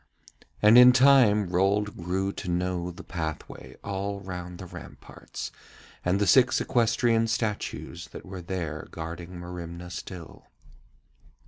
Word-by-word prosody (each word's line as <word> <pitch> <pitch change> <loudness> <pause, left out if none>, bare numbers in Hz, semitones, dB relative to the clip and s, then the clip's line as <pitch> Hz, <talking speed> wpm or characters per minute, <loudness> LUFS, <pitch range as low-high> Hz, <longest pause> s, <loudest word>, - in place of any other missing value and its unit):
And 110 +3 +8
in 125 0 +9
time 125 -7 +5
Rold 100 +3 +1
grew 95 +3 -2
to 90 - -6
know 90 0 -1
the 85 - -10
pathway 80 -5 -6
all 100 0 -3
round 90 -2 -7
the 95 - -8
ramparts, 90 -1 -9 0.5
and 90 +2 +1
the 105 - +2
six 130 +5 +5
equestrian 115 -1 +2
statues 110 -2 -3
that - - -11
were 95 -1 -7
there 85 -4 -4
guarding 85 +2 -7
Merimna 90 0 -7
still. 90 -2 -9
95 Hz, 125 wpm, -27 LUFS, 85-105 Hz, 0.5 s, in